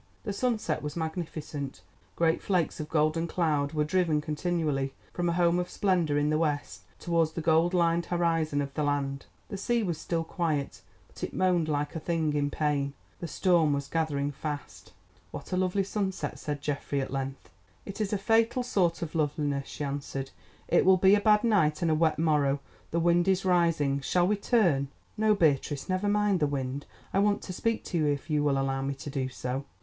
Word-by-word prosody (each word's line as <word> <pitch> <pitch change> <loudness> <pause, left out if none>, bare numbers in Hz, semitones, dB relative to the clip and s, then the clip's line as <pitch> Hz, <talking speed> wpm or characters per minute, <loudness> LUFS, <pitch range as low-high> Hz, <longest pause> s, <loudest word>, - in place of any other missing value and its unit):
The 205 - -3
sunset 235 +1 -1
was 150 0 -5
magnificent; 160 -4 -5 0.3
great 165 -1 +2
flakes 180 -4 0
of 150 0 -5
golden 155 +2 +1
cloud 155 -4 0
were 150 -1 +1
driven 160 -1 +1
continually 150 -3 -1 0.2
from 175 -1 0
a - - +1
home 175 0 +3
of 180 - -2
splendour 175 -7 +1
in 145 +1 +2
the 155 - +2
west 150 -3 -2 0.2
towards 165 -2 +1
the 165 - -3
cold 165 +2 +3
lined 170 -1 +2
horizon 165 -4 +1
of 140 0 -7
the 155 - -2
land. 140 -1 -1 0.2
The 200 - -4
sea 235 +3 0
was 170 -5 -2
still 165 -1 -1
quiet, 160 -4 -2 0.3
but - - -13
it - - -4
moaned 180 -3 +2
like 145 +1 -1
a - - -2
thing 160 -2 0
in 145 -1 +1
pain. 145 -2 -1 0.3
The 170 - -4
storm 165 -2 +3
was 140 0 -2
gathering 145 -3 -1
fast. 145 0 -6 0.4
"What - - -9
a - - +1
lovely 185 +1 +1
sunset," 195 -1 -3
said 145 -1 -4
Geoffrey 140 -1 -2
at 135 - -3
length. 135 -8 -5 0.3
"It 200 +2 -6
is 205 - -1
a 210 - +1
fatal 225 +5 +2
sort 180 -7 +1
of 160 - -5
loveliness," 145 -3 -1
she 150 - -6
answered; 140 -1 -4 0.4
"it - - +4
will 190 0 +6
be 190 +2 +5
a 205 - +4
bad 210 0 +4
night, 170 -10 +2
and 165 - +2
a - - +4
wet 155 0 +2
morrow. 150 -3 +2 0.3
The 170 - 0
wind 175 +1 +3
is 190 0 +2
rising; 165 -6 +2
shall 175 +6 +2
we 210 - +2
turn?" 185 - +2 0.3
"No, 215 0 +3
Beatrice, 145 -5 +1
never 185 +2 0
mind 205 -2 +2
the 150 - +2
wind. 140 0 -3 0.3
I 195 - +3
want 205 0 +2
to 185 - -6
speak 230 +4 -1
to 175 - -2
you, 155 - +2
if 145 +2 -2
you 150 -1 +2
will 140 -2 +2
allow 135 0 0
me 135 +1 -2
to 145 +2 -8
do 135 -2 -2
so." 130 +1 -4
160 Hz, 200 wpm, -28 LUFS, 145-180 Hz, 0.4 s, will